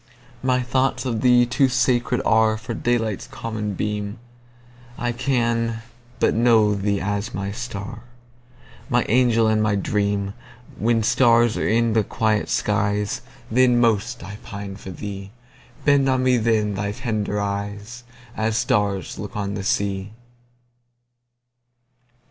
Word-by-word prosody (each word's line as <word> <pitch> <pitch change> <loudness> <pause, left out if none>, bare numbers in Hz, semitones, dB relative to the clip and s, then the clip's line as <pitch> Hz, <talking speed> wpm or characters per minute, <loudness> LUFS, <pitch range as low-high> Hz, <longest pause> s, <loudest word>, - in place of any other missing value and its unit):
My 130 -1 +1
thoughts 130 +2 0
of 115 -4 -1
thee 125 -1 +5
too 125 +2 +2
sacred 125 -1 +1
areFor 110 +2 +1
daylight's 115 -4 0
common 110 -6 -4
beam:I 120 +4 -6
can 115 -3 0 0.4
but - - +3
know 110 -2 +4
thee 100 0 0
as 100 +4 -3
my 100 0 -3
star, 105 -3 -6 0.9
My - - +3
angel 115 -1 +4
and 110 0 +2
my 105 -1 +2
dream; 100 0 -1 0.5
When 115 0 +2
stars 120 -1 +4
are - - -1
in 115 +1 +2
the 110 -1 +3
quiet 110 0 0
skies, 105 0 0 0.3
Then 125 0 +4
most 115 -1 +1
I 100 +3 -8
pine 100 -1 -7
for 95 - -10
thee; 100 +1 -7 0.6
Bend 140 -2 +4
on 130 -1 +2
me 130 -1 +4
then 110 -2 +1
thy 100 +1 -2
tender 105 -4 -2
eyes, 100 +4 -4 0.3
As 110 0 0
stars 100 -2 0
look 105 0 -6
on 100 -1 -2
the 100 -1 -4
sea! 100 -1 -1
110 Hz, 130 wpm, -22 LUFS, 100-120 Hz, 0.9 s, thee